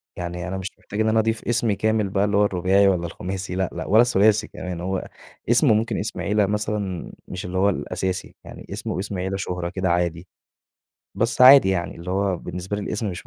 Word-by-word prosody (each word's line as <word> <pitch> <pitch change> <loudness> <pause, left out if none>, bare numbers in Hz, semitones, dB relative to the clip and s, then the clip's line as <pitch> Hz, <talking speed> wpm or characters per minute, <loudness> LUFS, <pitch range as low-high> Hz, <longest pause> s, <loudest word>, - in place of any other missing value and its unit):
يعني 90 0 -5
أنا 95 +1 -3
مش 95 0 -4
محتاج 105 +2 -5
إن 110 - +2
أنا 110 - +3
أضيف 110 0 -1
اسمي 115 -3 +1
كامل 110 -1 0
بقى 100 +1 +1
اللي 100 -1 +1
هو 105 - +5
الرباعي 95 +1 +3
ولا 90 -3 +1
الخماسي 90 +2 -5
لأ، 95 -1 0
لأ، 80 -2 -5
ولا 110 +4 +6
الثلاثي 110 -2 +3
كمان. 90 -2 -6
هو 95 +1 -3 0.4
اسمه 120 0 +5
ممكن 110 +2 0
اسم 105 - -4
عِيلة 105 0 +2
مثلًا 105 -3 -3 0.2
مش 90 -1 -6
اللي 90 +1 -4
هو 100 +2 +4
الأساسي. 90 -1 -3
يعني - - -11
اسمه - - -4
واسم 95 +1 -4
عِيلة 95 +1 -2
شهرة 90 -2 -3
كده 95 0 -2
عادي. 85 0 -1 0.9
بس 115 +2 -1
عادي 130 -4 +9
يعني 95 -2 -1
اللي 85 +2 -7
هو 95 0 0
بالنسبة 90 +4 -5
لي 105 - -4
الاسم 105 +1 -3
مش 90 - -8
95 Hz, 210 wpm, -23 LUFS, 90-105 Hz, 0.9 s, عادي